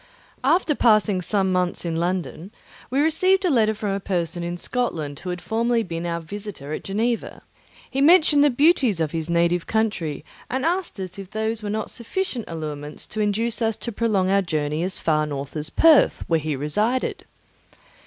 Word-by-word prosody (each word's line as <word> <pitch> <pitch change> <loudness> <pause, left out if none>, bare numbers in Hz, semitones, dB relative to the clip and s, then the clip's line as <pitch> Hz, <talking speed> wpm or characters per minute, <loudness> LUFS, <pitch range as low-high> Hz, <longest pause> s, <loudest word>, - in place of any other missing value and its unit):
After 315 +3 +3
passing 215 -7 +3
some 190 +1 0
months 180 -1 0
in 165 -1 -2
London, 175 0 -2 0.4
we 265 - 0
received 370 +5 +3
a 355 - +3
letter 220 -4 +3
from 210 -1 -3
a 195 - -1
person 175 -3 -2
in 175 +1 -3
Scotland 165 - -3
who 180 - -6
had 180 0 -5
formerly 230 +1 +1
been 170 -2 -4
our 170 0 -2
visitor 170 -4 -7
at - - -5
Geneva. 225 +4 -2 0.4
He 270 - -2
mentioned 305 -2 +6
the 295 - +5
beauties 270 - +3
of 160 -2 0
his 165 -1 -3
native 170 0 +1
country 185 -10 -1 0.2
and 260 +3 -1
asked 350 - -1
us 185 0 -6
if 195 -2 -8
those 220 +1 -2
were 210 - -4
not 215 +1 -3
sufficient 255 - -3
allurements 150 -2 -6
to 215 - -7
induce 225 +3 0
us 225 -2 0
to 235 - -5
prolong 200 -4 +1
our 200 0 +4
journey 155 -3 -2
as 185 +2 0
far 155 -1 +1
north 140 -1 -5
as 150 0 -3
Perth, 320 - +5
where 165 -1 +2
he 155 -1 -2
resided. 210 - -1
200 Hz, 185 wpm, -23 LUFS, 170-235 Hz, 0.4 s, mentioned